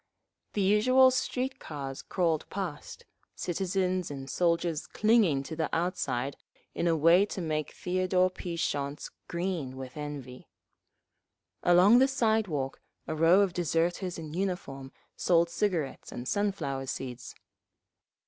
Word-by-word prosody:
The 205 - 0
usual 255 +7 +5
street 260 +1 -2
cars 135 -3 -6
crawled 165 -4 -1
past, 180 -7 -6 0.3
citizens 185 0 -1
and 135 -2 -7
soldiers 170 -1 0
clinging 210 -11 +3
to 160 - -6
the 160 0 -1
outside 145 -6 -1 0.4
in 175 - -1
a 165 -1 +3
way 165 +5 +6
to 200 - -5
make 155 -3 -2
Theodore 185 0 +1
P. 175 -2 -6
Shonts 145 -4 -3 0.2
green 170 -7 -3
with 130 -1 -8
envy…. 145 -4 -7 1.1
Along 180 +7 +6
the 265 - +5
sidewalk 220 - 0 0.2
a - - -3
row 165 +5 +5
of 195 -3 +1
deserters 175 +2 0
in 155 -2 -7
uniform 170 -8 -3 0.2
sold 170 -1 +2
cigarettes 170 -6 -2
and 120 +1 -6
sunflower 190 -10 -1
seeds…. 130 -2 -6
170 Hz, 125 wpm, -29 LUFS, 145-190 Hz, 1.1 s, way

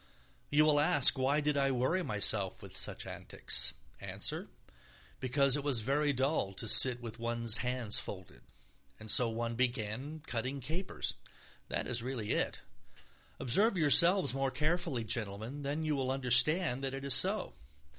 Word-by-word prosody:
You 150 +1 +2
will 150 -1 +2
ask 145 -2 +5
why 135 +3 -1
did 150 0 -1
I 140 -1 0
worry 130 +8 -1
myself 105 - -1
with - - -10
such - - -4
antics: - - -2 0.3
answer, - - -5 0.7
because 135 +1 +1
it 145 - -4
was 135 -6 -1
very 145 +5 -1
dull 135 -6 -2
to 115 - -4
sit 125 +2 +9
with 115 -1 -9
one's 115 -1 +1
hands 125 -4 -1
folded, 95 -3 -8 0.6
and 110 -1 -3
so 120 +1 +4
one 115 +1 -5
began 125 +4 -4
cutting 130 +3 -4
capers. 160 +9 -4 0.5
That - - -4
is 120 -1 -2
really 120 -4 -6
it. - - -3 0.8
Observe 200 - +2
yourselves 170 - +5
more 135 0 -2
carefully, 155 -3 -3
gentlemen, 110 +5 -6
then 145 +3 -5
you 155 -1 -2
will 130 -2 -3
understand 135 +3 +2
that 135 0 -4
it 135 0 -8
is 140 - +2
so. - - 0
130 Hz, 155 wpm, -31 LUFS, 115-145 Hz, 0.8 s, sit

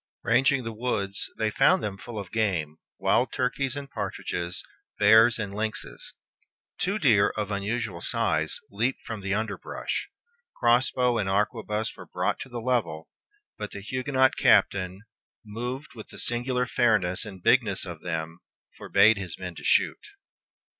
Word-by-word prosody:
Ranging 130 +3 +3
the 115 -1 -5
woods, 105 -4 -2
they 110 -1 0
found 170 - +4
them 100 -2 -2
full 110 +3 -9
of 100 -3 -6
game, 90 -9 -1 0.2
wild 125 -1 +2
turkeys 130 +1 -1
and 140 -1 -5
partridges, 90 -6 -4 0.3
bears 110 +3 +6
and 100 -3 -4
lynxes. 110 +1 -4 0.7
Two 200 +3 0
deer, 110 - +4
of 105 -1 -2
unusual 100 -2 -2
size, - - +1
leaped 120 +6 -1
from 110 -3 -5
the 100 0 -1
underbrush. 110 -1 -3 0.5
Cross 120 +1 +3
bow 125 -2 +2
and 100 -2 -1
arquebuse 105 +2 -1
were - - -11
brought - - -1
to 130 - -7
the 120 -1 -5
level; 110 -11 -1 0.5
but - - -4
the 100 - -8
Huguenot 130 +4 +1
captain, 95 +1 +3 0.4
"moved 125 +7 -5
with 110 -3 -10
the - - -12
singular 125 +1 0
fairness 110 -8 +2
and 95 -5 -10
bigness 110 -8 +3
of 85 -4 -8
them," 80 -1 -4 0.4
forbade 110 0 +5
his 90 -4 -6
men 90 -2 -6
to - - -11
shoot. - - +2
110 Hz, 150 wpm, -27 LUFS, 100-125 Hz, 0.7 s, bears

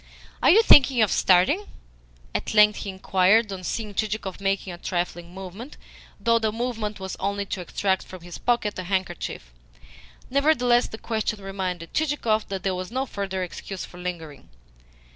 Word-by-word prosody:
"Are - - +5
you 440 +6 +7
thinking 265 - +7
of 210 - +1
starting?" 195 - +3 0.7
at - - -3
length 210 0 +6
he 200 - -5
inquired, 195 +3 +3
on 185 -1 -7
seeing 210 +3 -3
Chichikov 210 -2 -3
making 195 -1 -1
a 175 - -10
trifling 175 -1 -3
movement, 195 +8 -9 0.4
though 230 -1 +3
the 220 -1 0
movement 225 -3 -3
was 190 0 -5
only 200 +1 -1
to 190 -1 -4
extract 190 +2 0
from 185 -2 -10
his 175 -1 -9
pocket 225 -5 0
a - - -3
handkerchief. 180 - -3 0.8
Nevertheless 250 -4 +3
the 220 - -8
question 220 -2 -2
reminded 185 -4 -4
Chichikov 275 -8 0
that 195 -1 -4
there 190 -2 0
was 185 0 -4
no 260 +2 -1
further 195 -5 -3
excuse 180 +3 -6
for 180 - -13
lingering. 165 -6 -6
200 Hz, 160 wpm, -25 LUFS, 185-225 Hz, 0.8 s, you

